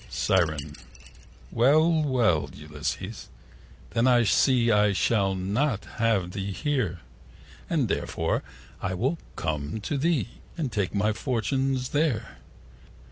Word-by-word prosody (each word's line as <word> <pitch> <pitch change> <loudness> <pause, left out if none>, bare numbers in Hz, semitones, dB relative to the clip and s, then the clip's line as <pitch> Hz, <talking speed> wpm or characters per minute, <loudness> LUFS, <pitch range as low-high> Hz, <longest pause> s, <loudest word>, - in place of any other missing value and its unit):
Siren.Well, 80 - 0
well, 120 - +2
Ulysses, 75 +7 -5 0.6
then 115 +2 +2
I 120 -2 +5
see 120 +3 +3
65 115 -2 +4
I 105 -1 +3
shall 100 -1 +1
not 105 +5 -1
have 105 -6 +1
thee 100 +1 -4
here: 110 - -1 0.7
And - - +1
therefore - - -1 0.4
I 95 - -2
will 135 - 0 0.2
come 75 +4 -3
to 140 +7 -2
thee, 160 -5 +1 0.3
And 150 -7 -2
take 100 -3 -1
my 105 +2 +2
fortune 130 +3 0 0.2
there. 145 -7 0
110 Hz, 115 wpm, -26 LUFS, 90-130 Hz, 0.7 s, I